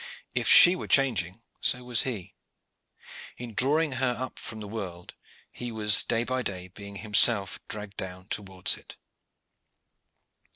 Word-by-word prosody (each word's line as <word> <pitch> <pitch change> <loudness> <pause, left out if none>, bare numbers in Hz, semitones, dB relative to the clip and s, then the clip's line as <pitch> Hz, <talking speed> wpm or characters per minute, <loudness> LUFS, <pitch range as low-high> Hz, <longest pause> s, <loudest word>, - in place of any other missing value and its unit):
If - - -1
she 175 +1 +8
were - - -7
changing, 115 -7 +1 0.2
so 125 0 +1
was 125 -2 0
he. 110 -9 -5 1.0
In 120 -2 -8
drawing 145 +8 +3
her 130 -1 0
up 130 - -6
from 110 -1 -7
the 105 - -7
world, 95 -5 -7 0.4
he 120 -1 -7
was 105 -2 +4
day 115 -1 0
by 130 +1 -2
day 90 -5 -5
being 100 +1 -11
himself 105 0 +3
dragged 105 -2 -6
down 95 0 -6
towards 95 -2 -1
it. - - -14
110 Hz, 140 wpm, -27 LUFS, 95-125 Hz, 1.0 s, she